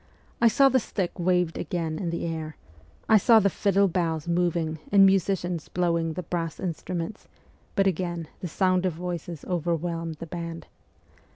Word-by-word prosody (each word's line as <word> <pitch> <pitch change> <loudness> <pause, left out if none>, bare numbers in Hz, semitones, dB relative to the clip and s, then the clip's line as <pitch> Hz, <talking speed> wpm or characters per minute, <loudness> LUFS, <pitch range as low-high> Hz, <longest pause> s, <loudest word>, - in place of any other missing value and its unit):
I 235 - +7
saw 275 +5 +5
the 260 -1 +4
stick 190 -5 -3
waved 180 -1 +1
again 165 -4 -3
in 175 - -2
the 170 0 -3
air; 160 -2 -4 0.5
I 220 - +7
saw 225 +3 +6
the 200 -2 +2
fiddle 200 +1 +2
bows 165 -3 -1
moving 170 -2 0
and 195 -1 +7
musicians 185 -3 +1
blowing 170 -2 0
the 180 - -5
brass 165 -1 -3
instruments, 180 +2 -4 0.5
but 195 -3 +3
again 175 -3 -1
the 180 - -4
sound 185 +2 +1
of 180 - -1
voices 175 -1 -5
overwhelmed 170 -1 -2
the 160 - -8
band. 170 -1 -6
175 Hz, 160 wpm, -26 LUFS, 165-185 Hz, 0.5 s, I